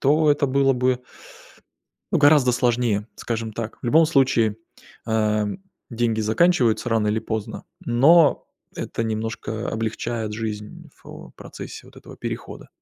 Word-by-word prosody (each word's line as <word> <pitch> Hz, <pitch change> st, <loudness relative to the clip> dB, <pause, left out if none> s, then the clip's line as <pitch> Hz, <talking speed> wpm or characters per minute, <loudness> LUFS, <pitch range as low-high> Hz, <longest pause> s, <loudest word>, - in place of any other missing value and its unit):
то 150 Hz, +2 st, +3 dB
это 145 Hz, -1 st, 0 dB
было 135 Hz, 0 st, +3 dB
бы 125 Hz, 0 st, 0 dB, 1.1 s
ну 170 Hz, -, +3 dB
гораздо 145 Hz, -4 st, +5 dB
сложнее, 120 Hz, -4 st, +1 dB
скажем 115 Hz, -1 st, -4 dB
так. 115 Hz, 0 st, -6 dB
В -, -, -4 dB
любом 160 Hz, +6 st, +5 dB
случае, 125 Hz, -8 st, +2 dB, 0.5 s
а, 110 Hz, -1 st, +1 dB, 0.4 s
деньги 115 Hz, -1 st, 0 dB
заканчиваются 120 Hz, 0 st, +2 dB
рано 110 Hz, -2 st, +1 dB
или 105 Hz, +1 st, +1 dB
поздно, 110 Hz, -1 st, -5 dB, 0.2 s
но 145 Hz, +6 st, +4 dB, 0.3 s
это 115 Hz, -, -4 dB
немножко 110 Hz, 0 st, -4 dB
облегчает 110 Hz, 0 st, -3 dB
жизнь 105 Hz, -1 st, -6 dB
в, -, -, -11 dB
э, -, -, -18 dB
процессе -, -, -10 dB
вот -, -, -18 dB
этого -, -, -13 dB
перехода. -, -, -7 dB
115 Hz, 135 wpm, -23 LUFS, 110-135 Hz, 1.1 s, гораздо